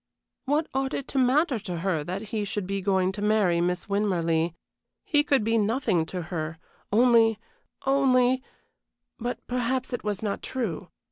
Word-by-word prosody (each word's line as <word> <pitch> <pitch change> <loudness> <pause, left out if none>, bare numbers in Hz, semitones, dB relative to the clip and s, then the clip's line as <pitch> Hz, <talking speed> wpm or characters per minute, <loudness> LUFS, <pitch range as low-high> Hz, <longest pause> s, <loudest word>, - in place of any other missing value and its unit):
What 295 +3 +1
ought 270 0 -1
it 280 - -4
to 270 - 0
matter 260 +1 +3
to 185 -4 -5
her 175 -5 0
that 195 +6 -5
he 215 -1 -1
should 200 -1 -3
be 195 +1 -2
going 190 -1 +2
to 205 +1 -7
marry 205 -5 +3
Miss 180 +1 -1
Winmarleigh? 170 -5 0 0.5
He 295 -2 +3
could 275 -6 +2
be 225 +1 +2
nothing 210 -6 +1
to 180 0 -4
her 160 -1 -3 0.3
only 225 -1 +5 0.5
only 260 -2 +3 0.8
but 245 +1 -4
perhaps 250 +1 -1
it 245 - -3
was 210 -1 -2
not 205 -2 -2
true. 200 -8 -3
215 Hz, 160 wpm, -26 LUFS, 185-255 Hz, 0.8 s, only